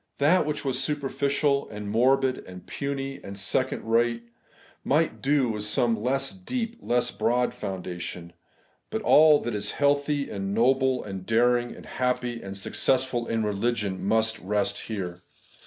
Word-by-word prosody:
That 155 Hz, +3 st, +3 dB
which 150 Hz, -1 st, -3 dB
was 135 Hz, 0 st, -1 dB
superficial, 140 Hz, 0 st, 0 dB
and 105 Hz, -1 st, -7 dB
morbid, 130 Hz, +4 st, +2 dB
and 90 Hz, -1 st, -10 dB
puny, 135 Hz, -1 st, -4 dB
and 100 Hz, 0 st, -8 dB
second 130 Hz, +6 st, -1 dB
rate, 115 Hz, +1 st, +1 dB, 0.6 s
might 155 Hz, +4 st, +1 dB
do 135 Hz, -2 st, +2 dB
with 105 Hz, -1 st, -2 dB
some 115 Hz, +2 st, +2 dB
less 135 Hz, +3 st, 0 dB
deep, 230 Hz, +4 st, -4 dB
less 120 Hz, 0 st, +1 dB
broad 120 Hz, +3 st, +1 dB
foundation; 90 Hz, -2 st, -6 dB, 0.6 s
but -, -, -3 dB
all 155 Hz, -1 st, +7 dB
that 120 Hz, -, -3 dB
is 105 Hz, 0 st, -1 dB
healthy, 145 Hz, 0 st, +2 dB
and 100 Hz, 0 st, -3 dB
noble, 130 Hz, +2 st, +3 dB
and 95 Hz, -2 st, -6 dB
daring, 120 Hz, +3 st, +2 dB
and -, -, -12 dB
happy, 125 Hz, -2 st, -2 dB
and 95 Hz, 0 st, -7 dB
successful 125 Hz, +4 st, 0 dB
in 115 Hz, -1 st, 0 dB
religion 105 Hz, -2 st, -1 dB
must 110 Hz, +2 st, +1 dB
rest 100 Hz, +1 st, -1 dB
here. 90 Hz, -5 st, -4 dB
120 Hz, 145 wpm, -26 LUFS, 105-135 Hz, 0.6 s, all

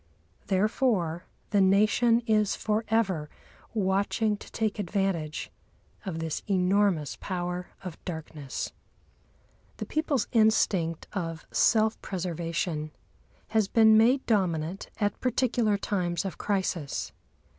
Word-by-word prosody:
Therefore 190 Hz, -4 st, +1 dB, 0.3 s
the 205 Hz, -2 st, +4 dB
Nation 215 Hz, +5 st, +4 dB
is 215 Hz, -3 st, +2 dB
for 215 Hz, +1 st, -1 dB
ever 190 Hz, -9 st, +1 dB, 0.5 s
watching 200 Hz, +2 st, +1 dB
to -, -, -13 dB
take 220 Hz, -1 st, -1 dB
advantage 185 Hz, -5 st, -2 dB, 0.6 s
of 170 Hz, -4 st, -3 dB
this 165 Hz, -1 st, -3 dB
enormous 185 Hz, -5 st, +2 dB
power 180 Hz, -1 st, -3 dB, 0.2 s
of 180 Hz, -4 st, -8 dB
darkness. 155 Hz, -5 st, -5 dB, 1.1 s
The -, -, -4 dB
people's 305 Hz, -4 st, 0 dB
instinct 195 Hz, -7 st, +2 dB
of 165 Hz, -4 st, -4 dB
self 220 Hz, -1 st, +3 dB
preservation 170 Hz, -3 st, -3 dB, 0.6 s
has 220 Hz, -2 st, +2 dB
been 220 Hz, +1 st, +6 dB
made 245 Hz, +5 st, +4 dB
dominant 180 Hz, -4 st, 0 dB
at 205 Hz, -1 st, -1 dB
particular 240 Hz, -4 st, +1 dB
times 180 Hz, -3 st, -1 dB
of 190 Hz, -, -5 dB
crisis. 185 Hz, -7 st, -2 dB
195 Hz, 105 wpm, -28 LUFS, 170-220 Hz, 1.1 s, been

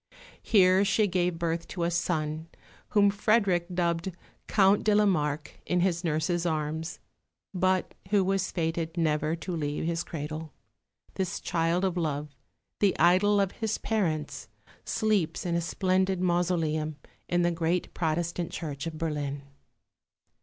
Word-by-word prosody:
Here 190 Hz, -2 st, +5 dB
she 210 Hz, +1 st, +3 dB
gave 180 Hz, -3 st, 0 dB
birth 165 Hz, 0 st, -2 dB
to 175 Hz, -, -4 dB
a 170 Hz, -, +1 dB
son, 160 Hz, -2 st, -1 dB, 0.4 s
whom 205 Hz, -3 st, +4 dB
Frederick 200 Hz, -4 st, +2 dB
dubbed 175 Hz, 0 st, 0 dB, 0.4 s
Count 200 Hz, -1 st, +4 dB
de 210 Hz, -1 st, +3 dB
la 210 Hz, 0 st, +5 dB
Marke 150 Hz, -5 st, -1 dB
in 180 Hz, 0 st, +2 dB
his 175 Hz, -1 st, +1 dB
nurse's 165 Hz, +1 st, 0 dB
arms, 160 Hz, 0 st, -2 dB, 0.6 s
but 185 Hz, 0 st, +1 dB, 0.2 s
who 205 Hz, -1 st, +4 dB
was 190 Hz, 0 st, 0 dB
fated 165 Hz, 0 st, -2 dB
never 155 Hz, -1 st, +1 dB
to 175 Hz, +1 st, -5 dB
leave 150 Hz, -1 st, -2 dB
his 170 Hz, 0 st, -1 dB
cradle. 155 Hz, -1 st, -6 dB, 0.6 s
This 185 Hz, -2 st, -2 dB
child 170 Hz, +2 st, 0 dB
of 185 Hz, -2 st, -1 dB
love, 150 Hz, -3 st, -2 dB, 0.4 s
the 200 Hz, -2 st, +3 dB
idol 185 Hz, +5 st, +4 dB
of 195 Hz, -1 st, +1 dB
his 220 Hz, -2 st, -2 dB
parents, 165 Hz, -9 st, -2 dB, 0.4 s
sleeps 210 Hz, -8 st, 0 dB
in 175 Hz, -, -1 dB
a 170 Hz, -, +1 dB
splendid 185 Hz, +1 st, +1 dB
mausoleum 170 Hz, -4 st, 0 dB, 0.3 s
in 175 Hz, 0 st, +2 dB
the 175 Hz, -, +2 dB
great 170 Hz, +1 st, -1 dB
Protestant 170 Hz, +1 st, -1 dB
Church 145 Hz, -2 st, -5 dB
of 160 Hz, -1 st, -6 dB
Berlin. 145 Hz, -3 st, -3 dB
170 Hz, 140 wpm, -28 LUFS, 160-185 Hz, 0.6 s, Here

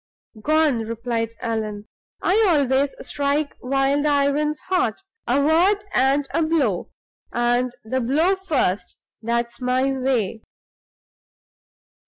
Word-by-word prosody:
"Gone!" 310 Hz, -2 st, +2 dB
replied 230 Hz, 0 st, -3 dB
Allan. 215 Hz, -2 st, -3 dB, 0.4 s
"I 425 Hz, +5 st, +3 dB
always 280 Hz, -3 st, +2 dB
strike 285 Hz, +1 st, -1 dB
while 270 Hz, +2 st, +1 dB
the 300 Hz, -, +1 dB
iron's 290 Hz, +1 st, +1 dB
hot 365 Hz, -, -1 dB, 0.2 s
a 250 Hz, +4 st, +2 dB
word 350 Hz, +8 st, +3 dB
and 275 Hz, +2 st, +2 dB
a 330 Hz, -, +2 dB
blow, 320 Hz, -1 st, 0 dB, 0.4 s
and 240 Hz, +1 st, +1 dB
the 260 Hz, +4 st, -2 dB
blow 310 Hz, +10 st, +2 dB
first, 300 Hz, -, -1 dB, 0.2 s
that's 235 Hz, +2 st, -2 dB
my 255 Hz, +2 st, +1 dB
way. 255 Hz, -5 st, -1 dB
270 Hz, 110 wpm, -22 LUFS, 235-300 Hz, 0.4 s, I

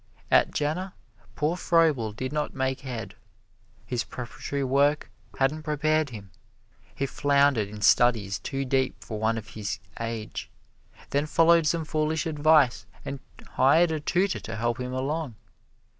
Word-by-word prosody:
At -, -, +5 dB
Jena 160 Hz, +6 st, -2 dB, 0.4 s
poor 150 Hz, +3 st, 0 dB
Froebel 155 Hz, -11 st, +2 dB
did 130 Hz, +6 st, -5 dB
not 150 Hz, -1 st, -2 dB
make 130 Hz, -1 st, -1 dB
head. 125 Hz, -5 st, -6 dB, 0.7 s
His 120 Hz, -2 st, -2 dB
preparatory 135 Hz, +3 st, -5 dB
work 140 Hz, +3 st, +2 dB, 0.3 s
hadn't 140 Hz, +4 st, +1 dB
prepared 155 Hz, 0 st, +1 dB
him. 100 Hz, -5 st, -10 dB, 0.6 s
He 140 Hz, -, -1 dB
floundered 140 Hz, -5 st, +2 dB
in 105 Hz, +1 st, -9 dB
studies 105 Hz, -5 st, +3 dB
too 135 Hz, +8 st, -3 dB
deep 130 Hz, 0 st, +1 dB
for 110 Hz, -1 st, -6 dB
one 110 Hz, +1 st, +1 dB
of 110 Hz, -, -7 dB
his 110 Hz, +1 st, -4 dB, 0.2 s
age, 115 Hz, -1 st, -5 dB, 0.6 s
then 145 Hz, +2 st, +1 dB
followed 165 Hz, 0 st, +4 dB
some 165 Hz, 0 st, 0 dB
foolish 155 Hz, +2 st, -1 dB
advice 150 Hz, -7 st, +3 dB, 0.2 s
and 140 Hz, -, -5 dB, 0.3 s
hired 160 Hz, +6 st, +4 dB
a 160 Hz, -, -1 dB
tutor 185 Hz, +6 st, 0 dB
to -, -, -7 dB
help 120 Hz, +3 st, -1 dB
him 125 Hz, 0 st, -4 dB
along. 135 Hz, 0 st, -3 dB
135 Hz, 145 wpm, -26 LUFS, 115-155 Hz, 0.7 s, At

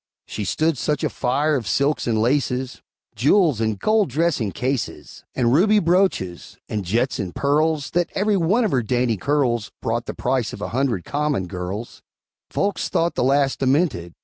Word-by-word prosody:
She 105 Hz, -, -5 dB
stood 155 Hz, -, 0 dB
such 150 Hz, -2 st, -1 dB
a -, -, 0 dB
fire 145 Hz, +5 st, 0 dB
of 120 Hz, -6 st, -3 dB
silks 140 Hz, +4 st, +1 dB
and 110 Hz, -2 st, +1 dB
laces, 125 Hz, +1 st, 0 dB, 0.3 s
Jewels 150 Hz, -, +3 dB
and 110 Hz, -2 st, 0 dB
gold 215 Hz, -, +2 dB
dressing 140 Hz, -7 st, 0 dB
cases, 130 Hz, +1 st, -4 dB
And 120 Hz, -2 st, +2 dB
ruby 205 Hz, +8 st, +4 dB
brooches, 175 Hz, -, 0 dB
and 105 Hz, -2 st, -3 dB
jets 115 Hz, +8 st, 0 dB
and 90 Hz, -2 st, -4 dB
pearls, 150 Hz, +1 st, +1 dB
That 175 Hz, 0 st, +1 dB
every 205 Hz, +1 st, +2 dB
one 195 Hz, +7 st, +2 dB
of 210 Hz, -, 0 dB
her 130 Hz, -, +2 dB
dainty 120 Hz, 0 st, 0 dB
curls 120 Hz, -2 st, 0 dB
Brought 115 Hz, +1 st, -2 dB
the -, -, -5 dB
price 125 Hz, -2 st, -1 dB
of -, -, -8 dB
a -, -, -3 dB
hundred 120 Hz, -7 st, -1 dB
common 145 Hz, -9 st, -1 dB
girls; 90 Hz, +5 st, -6 dB, 0.5 s
Folks 200 Hz, 0 st, -1 dB
thought 170 Hz, +1 st, +1 dB
the -, -, 0 dB
lass 135 Hz, +1 st, +2 dB
demented! 130 Hz, -, 0 dB
135 Hz, 175 wpm, -22 LUFS, 115-155 Hz, 0.5 s, ruby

